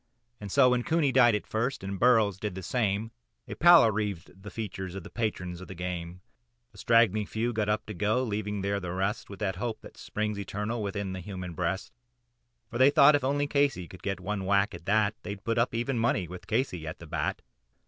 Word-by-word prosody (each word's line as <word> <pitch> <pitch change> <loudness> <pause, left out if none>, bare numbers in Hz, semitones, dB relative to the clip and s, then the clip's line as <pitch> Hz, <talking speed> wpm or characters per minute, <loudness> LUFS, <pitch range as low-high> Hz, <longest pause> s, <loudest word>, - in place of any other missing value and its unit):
And 100 - -7
so, 130 +1 +5
when 125 -1 +2
Cooney 155 +1 +1
died 120 -4 +5
at 105 - -3
first, 115 +1 -2
and 95 0 -4
Burrows 110 -6 +4
did 105 -3 -4
the 95 - -6
same, 110 +1 -1 0.4
A - - -5
pallor 170 -9 +7
wreathed 100 -3 -4
the 105 - -8
features 95 -4 -6
of 95 - -6
the - - -11
patrons 90 -6 -3
of 95 - -9
the 95 - -8
game. 90 0 -5 0.5
A - - -15
straggling 110 -3 +3
few 115 +4 -2
got 105 -1 -1
up 105 - 0
to 110 - -6
go, 105 +6 +1
leaving 105 -3 -3
there 100 +1 -1
the 90 -2 -5
rest, 95 +4 -2
With 100 - -8
that 95 -3 -1
hope 115 +1 -4
which - - -13
springs 105 -1 -3
eternal 105 +3 -3
within 100 -2 -3
the 95 - -5
human 90 -1 -6
breast. 90 +3 -2 0.8
For 120 - -4
they 130 +2 +7
thought 145 +1 +7
if 145 -2 +2
only 145 +2 +1
Casey 140 -10 +1
could 95 +1 -13
get 95 -2 -3
a - - -14
whack 100 +1 +1
at 85 -1 -10
that, 105 0 +3
They'd 100 0 -7
put 115 0 0
up 115 0 +1
even 120 +1 -1
money 110 -6 +1
with 90 +1 -10
Casey 105 - -1
at 80 - -5
the 85 - -11
bat. 75 -2 -3
105 Hz, 220 wpm, -28 LUFS, 95-115 Hz, 0.8 s, pallor